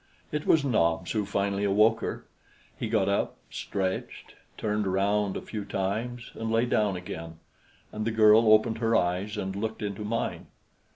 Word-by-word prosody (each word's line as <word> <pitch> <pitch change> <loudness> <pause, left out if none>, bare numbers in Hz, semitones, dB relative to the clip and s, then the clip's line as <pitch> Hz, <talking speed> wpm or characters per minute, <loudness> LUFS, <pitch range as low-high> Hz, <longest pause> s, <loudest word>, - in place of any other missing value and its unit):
It 150 0 -3
was 150 -3 +4
Nobs 85 -8 +1
who 105 -3 -1
finally 100 0 -1
awoke 105 +3 +4
her. - - -5 0.5
He 115 - -4
got 105 -4 +2
up, 100 0 0
stretched, 95 -2 -4 0.2
turned 105 -1 -1
around 100 +1 +1
a - - -7
few 105 -2 -5
times 110 +6 -3
and 115 0 -4
lay 115 +2 +2
down 105 -5 +1
again, 85 -2 -7 0.5
and 110 - -4
the 115 - 0
girl 110 0 +6
opened 110 +1 +4
her 115 -1 +2
eyes 95 +3 0
and 95 -1 -3
looked 110 +2 -3
into 100 0 -4
mine. 115 +2 -3
105 Hz, 165 wpm, -28 LUFS, 95-110 Hz, 0.5 s, girl